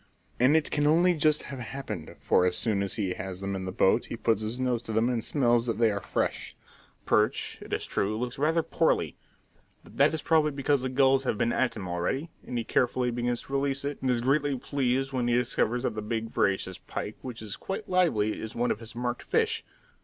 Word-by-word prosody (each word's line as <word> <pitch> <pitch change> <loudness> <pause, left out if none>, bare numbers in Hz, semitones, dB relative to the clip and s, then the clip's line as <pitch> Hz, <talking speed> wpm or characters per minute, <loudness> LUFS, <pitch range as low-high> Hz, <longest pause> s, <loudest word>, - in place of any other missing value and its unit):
And 130 +6 +5
it 155 - 0
can 145 0 +2
only 175 +4 +5
just 155 -2 +2
have 135 -2 -7
happened, 135 +3 -6
for - - +3
as 90 - -1
soon 105 -4 0
as 100 -1 -2
he 95 -5 -1
has 95 0 -6
them 100 0 -3
in 95 -1 -4
the 95 - -3
boat 95 +5 +3
he - - -5
puts 110 -2 +1
his 110 +3 -3
nose 125 -3 0
to 115 - -6
them 110 +2 +2
and 120 -3 -1
smells 120 -4 +2
that 115 -3 -1
they 115 -1 +4
are 100 0 -3
fresh. - - -2 0.5
The - - -36
perch, - - +1
it - - -11
is - - -1
true, 105 +2 -1
looks 125 +2 -4
rather 160 +3 +2
poorly, - - +1 0.7
but - - -16
that - - +5
is 160 - -4
probably 155 -2 +3
because 140 0 +1
the 130 - -2
gulls 135 0 +4
have 125 -5 -1
been 120 - +1
at 130 - +1
him 95 -3 -5
already; 90 - -2
and 125 - -5
he 115 - -1
carefully 125 +1 +1
begins 120 0 -1
to 135 - -11
release 140 0 0
it, 145 0 -4
and 130 - 0
is 120 -2 +2
greatly 140 +2 +1
pleased 135 0 -1
when 125 -2 0
he 120 - +3
discovers 125 0 +1
that - - 0
the 110 - -4
big, 115 +1 -3
voracious 95 -2 0
pike, 105 - -6
which 120 -4 -7
is 105 -2 -5
quite 200 +3 -5
lively, 155 - +2
is 110 +2 -6
one 120 +1 +1
of - - -2
his 115 0 -11
marked 120 0 -2
fish. - - 0
125 Hz, 235 wpm, -28 LUFS, 110-140 Hz, 0.7 s, And